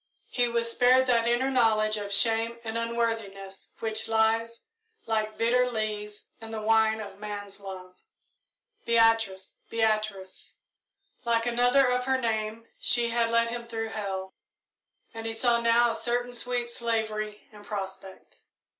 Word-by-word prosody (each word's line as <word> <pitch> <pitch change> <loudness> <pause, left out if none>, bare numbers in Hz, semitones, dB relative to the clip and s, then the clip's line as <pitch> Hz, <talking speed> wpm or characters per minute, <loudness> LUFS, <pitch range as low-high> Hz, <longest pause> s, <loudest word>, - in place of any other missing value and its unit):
He 245 -1 +2
was 235 0 -1
spared 255 +2 +4
that 235 -2 +2
inner 250 +3 +1
knowledge 215 -4 +3
of 205 -1 -5
shame 225 +2 +3
and 220 0 -5
unworthiness 225 -4 -3
which 220 -1 -2
lies, 225 +1 +1 0.4
like 215 -1 -1
bitter 250 +2 +2
lees, 210 -2 -4
in 225 - -9
the 225 -1 -4
wine 220 0 +3
of 200 -2 -8
man's 205 -1 -7
love. 185 -2 -9 0.9
"Beatrice! 225 -5 +2
Beatrice!" 215 -4 -2 0.7
Like 230 -1 +1
another 245 +3 +3
of 250 0 0
her 265 0 +1
name 220 -1 -2
she 240 -1 +2
had 230 0 +1
led 230 0 +2
him 235 0 -5
through 225 -1 -4
hell, 195 -3 -5 0.8
and 225 0 -7
he 225 - -3
saw 235 +1 +2
now 235 0 +4
a - - -4
certain 245 +2 -1
sweet 245 0 -1
slavery 220 -3 -3
in 210 -1 -14
prospect. 195 -2 -7
225 Hz, 140 wpm, -27 LUFS, 215-235 Hz, 0.9 s, spared